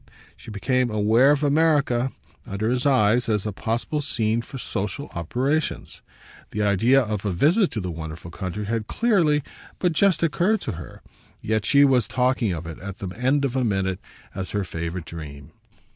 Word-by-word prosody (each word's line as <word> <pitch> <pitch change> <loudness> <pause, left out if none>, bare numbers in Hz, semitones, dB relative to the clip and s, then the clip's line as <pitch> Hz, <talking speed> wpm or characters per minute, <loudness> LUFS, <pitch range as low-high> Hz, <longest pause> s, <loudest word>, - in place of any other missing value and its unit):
She - - -13
became 125 +4 0
aware 110 +5 +4
of 145 0 +3
America, 145 -4 +2 0.4
under 110 +2 -1
his 125 +2 +1
eyes, 120 -2 +3
as 105 -2 0
a 105 - -1
possible 115 +9 -2
scene 115 -5 0
for 135 - -9
social 120 +4 -4
operations; 130 - -2 0.5
the 105 - -2
idea 110 +7 +4
of 105 -3 -3
a 105 - -1
visit 170 - +3
to 110 - -4
the 90 -3 -4
wonderful 80 +1 -7
country 95 +4 -4
had 110 0 -2
clearly 170 - +2 0.3
but 180 -2 +1
just 180 0 +3
occurred 180 +7 +2
to - - -3
her, 85 0 -10 0.4
yet 110 -1 0
she 140 0 +6
was 130 -5 +3
talking 125 -4 +1
of 85 -1 -4
it, 80 -1 -8
at 100 0 -7
the 100 - -5
end 130 +8 +1
of 130 -2 -2
a 130 - +1
minute, 95 -4 0 0.3
as 95 -1 -5
her 105 -1 -1
favourite 85 0 -5
dream. 70 -4 -9
115 Hz, 175 wpm, -24 LUFS, 95-140 Hz, 0.5 s, she